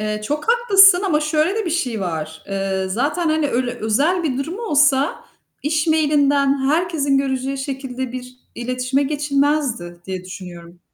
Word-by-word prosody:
Eee, 215 0 -2
çok 300 - -3
haklısın 395 -6 +6
ama 305 -4 +2
şöyle 305 +4 +1
de 440 - -1
bir 340 - -1
şey 250 -10 -1
var: 160 -3 -4
Eee, 195 -1 -2
zaten, 295 - -1
hani, 310 -2 +1
öyle 245 0 -1
özel 275 +11 0
bir 270 -6 -1
durum 320 +9 -4
olsa 290 - +2 0.4
iş 310 +2 0
mail'inden 285 -3 +2
herkesin 305 -4 +1
göreceği 270 0 -2
şekilde 265 -2 -5
bir 250 0 -8 0.2
iletişime 255 +3 -1
geçilmezdi 280 - -1
diye 185 -1 -5
düşünüyorum. 175 -2 -10
275 Hz, 150 wpm, -20 LUFS, 235-305 Hz, 0.4 s, haklısın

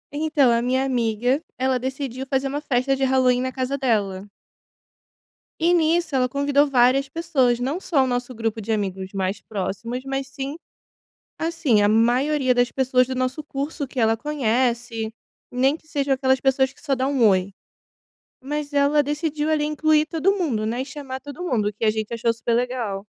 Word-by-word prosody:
Então 300 -4 +3
a 235 0 +2
minha 260 +2 +1
amiga, 245 +1 0 0.2
ela 260 0 +1
decidiu 265 0 -4
fazer 265 0 0
uma 285 +2 -3
festa 270 -1 +1
de 270 - -2
Halloween 255 -1 +3
na 260 0 -2
casa 260 +1 -2
dela. 205 -6 -1 1.3
E 340 +2 +3
nisso 330 -2 +2
ela 255 -1 +3
convidou 285 +2 +2
várias 265 +1 +3
pessoas. 270 -6 +1
Não 275 +8 -2
só 300 -8 +1
o - - 0
nosso 245 0 -2
grupo 225 -1 -2
de 220 +2 -4
amigos 190 -3 -2
mais 190 0 -2
próximos, 220 +5 -4
mas 270 0 -3
sim 275 +1 -5 0.8
assim, 320 -10 +1
a 205 - +4
maioria 255 +5 +3
das 245 0 +2
pessoas 255 -1 +2
do 260 - -3
nosso 255 +4 -2
curso 285 +1 -4
que 260 - -6
ela 225 -1 +3
conhece, 240 -4 -1 0.4
nem 260 +3 +2
que 320 - -17
seja 285 -3 0
aquelas 265 0 +2
pessoas 265 0 +2
que - - -23
só 280 -3 0
dá 260 +1 0
um 265 -5 +3
oi. 190 -1 +2 0.9
Mas 295 +2 -4
ela 285 +1 +3
decidiu 295 +1 -2
ali 300 -1 +1
incluir 305 0 +2
todo 330 +5 +1
mundo, 260 - -1
né. 235 +3 -2
E - - -4
chamar 275 -2 -7
todo 290 +6 -8
mundo, 230 -11 0
o - - -10
que 210 - -3
a 215 - +4
gente 215 0 -4
achou 230 0 +1
super 230 +1 -2
legal. 235 -5 -2
260 Hz, 185 wpm, -23 LUFS, 235-285 Hz, 1.3 s, a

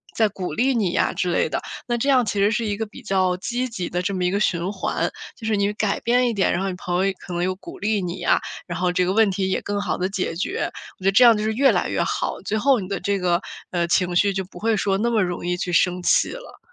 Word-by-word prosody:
再 220 - +4
鼓 185 -5 -5
励 260 - +2
你 205 -6 +1
呀 - - +1
之 180 - -1
类 165 - +1
的， - - -1 0.3
那 240 - 0
这 240 - -1
样 255 -3 +4
其 205 -1 -2
实 200 +2 +4
是 230 +1 0
一 205 -1 -2
个 220 - -2
比 210 - -13
较 185 -2 +1
积 245 +6 -2
极 190 -7 -4
的 175 - -1
这 190 +2 -2
么 185 -1 -1
一 180 - +2
个 200 - 0
循 180 -3 0
环。 195 -2 -1 0.3
就 225 - -10
是 220 - +2
你 200 +1 +1
改 210 -1 -1
变 245 +1 +2
一 - - -1
点， 200 -3 +2
然 175 - -1
后 195 - -1
你 185 - -4
朋 180 +1 -1
友 195 - 0
可 180 - -8
能 175 0 -1
又 185 0 0
鼓 190 - -11
励 210 0 0
你 180 0 -4
呀， - - +3 0.3
然 170 -2 -4
后 180 -1 +1
这 180 0 +1
个 185 - 0
问 220 0 +4
题 190 0 -1
也 - - 0
更 205 0 -2
好 - - -1
地 185 - 0
解 190 -4 -2
决。 170 - -2 0.3
我 - - -14
觉 - - -5
得 195 - +5
这 220 +6 +6
样 235 -2 +8
就 210 - -2
是 220 - 0
越 270 +4 +4
来 - - 0
越 - - 0
好， - - -2
最 215 - 0
后 265 +3 +3
你 185 - -5
的 195 -2 -3
这 200 0 0
个， 175 -1 +1 0.3
呃， 170 -1 0
情 180 0 +1
绪， 200 +2 +3
就 190 0 -2
不 185 - -13
会 225 0 +1
说 195 -1 +1
那 235 - +1
么 225 -2 +2
容 175 -1 -3
易 180 0 0
去 180 0 -3
生 180 +1 +2
气 - - +3
了。 - - -10
195 Hz, 325 characters per minute, -23 LUFS, 180-220 Hz, 0.3 s, 样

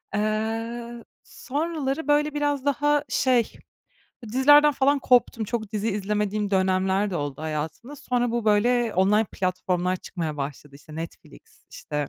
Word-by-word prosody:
Eee, 225 +3 -2 0.2
sonraları, 295 0 -3
böyle, 295 0 +2
biraz 290 -2 -1
daha, 290 +1 +2
şey, 250 -3 +2 0.8
dizilerden 290 +3 +6
falan 280 +1 +2
koptum. 245 -3 +2
Çok 220 -1 -4
dizi 215 +1 -1
izlemediğim 210 0 -1
dönemler 190 +1 +1
de 175 - -2
oldu 145 -1 -4
hayatımda. 160 - -5
Sonra 245 -2 -1
bu, 235 -1 -2
böyle, 230 +2 +2
online 210 +4 +4
platformlar 185 0 -1
çıkmaya 165 -4 -5
başladı, 140 0 -6
işte, 155 +1 -14
Netflix, 165 - -10
işte, 150 -2 -4
220 Hz, 130 wpm, -25 LUFS, 185-260 Hz, 0.8 s, dizilerden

